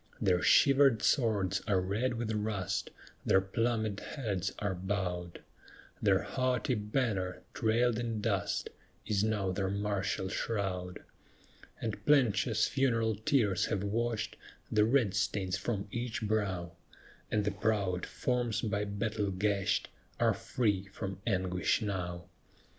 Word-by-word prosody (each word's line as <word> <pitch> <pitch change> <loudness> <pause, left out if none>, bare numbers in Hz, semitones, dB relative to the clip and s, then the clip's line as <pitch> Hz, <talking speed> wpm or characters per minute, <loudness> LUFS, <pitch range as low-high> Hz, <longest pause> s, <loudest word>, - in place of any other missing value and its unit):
Their 90 -2 +2
shivered 135 -5 +5
swords 110 -8 +2
are 100 -3 +3
red 110 +7 -1
with 115 -1 -2
rust; 105 -3 -2 0.3
Their 95 - +4
plumèd 110 +1 -1
heads 100 - -3
are 100 -2 -1
bowed; 90 -2 -3 0.6
Their 100 -2 +3
haughty 130 -2 0
banner, 105 -4 -1
trailed 115 +1 +2
in 115 -2 -2
dust, 100 -5 -1 0.3
Is 105 -1 +1
now 105 -3 0
their 95 0 -1
martial 100 -1 -1
shroud. 95 -4 -2 0.8
And 110 -3 -4
plenteous 110 -6 +3
funeral 115 -4 +1
tears 110 - +2
have 100 - -1
washed 115 +2 -1 0.3
The 105 -1 +4
red 115 -5 +3
stains 95 -3 0
from 105 -4 -2
each 120 -1 -3
brow, 100 -5 -1 0.6
And 105 -2 +1
the 105 - +1
proud 100 -3 0
forms, 120 -4 -1
by 105 -2 0
battle 100 0 -1
gashed, 100 +1 0 0.3
Are - - +4
free 100 -6 -1
from 95 -1 -6
anguish 95 -1 +1
now. 90 -4 -3
105 Hz, 125 wpm, -32 LUFS, 95-115 Hz, 0.8 s, shivered